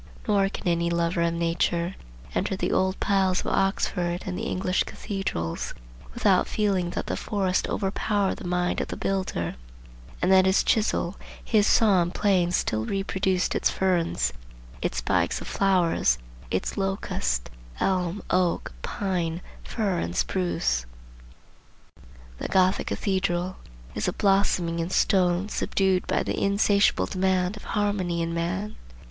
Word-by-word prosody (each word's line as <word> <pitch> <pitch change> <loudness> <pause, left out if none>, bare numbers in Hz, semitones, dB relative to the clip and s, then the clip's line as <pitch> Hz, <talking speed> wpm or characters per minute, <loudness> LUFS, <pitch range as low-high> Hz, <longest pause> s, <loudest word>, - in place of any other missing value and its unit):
Nor 200 -2 +3
can - - -6
any 170 0 +1
lover 170 0 0
of 170 0 +1
nature 170 +1 0 0.4
enter 190 - 0
the - - -1
old 190 +1 +1
piles 190 -2 +2
of - - -7
Oxford 180 -2 0
and 185 - -3
the 225 +5 -3
English 185 0 0
cathedrals, 195 - -4 0.4
without - - +3
feeling 195 -5 0
that 175 - -3
the - - -2
forest 190 -3 0
overpowered 200 0 0
the - - -7
mind 180 0 0
of - - -3
the - - -5
builder, 185 - -2 0.6
and 180 - +2
that 190 0 +6
his 190 - +4
chisel, 210 -4 +1 0.3
his 210 -2 +3
saw 205 -5 +5
and 175 +1 -2
plane 190 -4 +2
still 110 -11 0
reproduced 190 - 0
its - - +2
ferns, 170 - 0 0.5
its - - -2
spikes - - +1
of - - -8
flowers, 180 - +2 0.3
its 95 - -2
locust, 130 - -1 0.3
elm, 185 0 0
oak, 180 - +1
pine, 175 - -2 0.2
fir 200 -6 -1
and 85 +1 -3
spruce. 65 -4 0 1.5
The - - -3
Gothic 185 0 +2
cathedral 185 -2 -1 0.4
is - - -2
a - - 0
blossoming 195 -4 +2
in 165 +1 -1
stone 185 -1 +2
subdued 190 -3 +1
by - - +1
the - - -2
insatiable 200 +1 +3
demand 185 0 0
of 210 - -11
harmony 195 -5 0
in 165 0 -2
man. 180 +5 -2
185 Hz, 140 wpm, -26 LUFS, 170-195 Hz, 1.5 s, that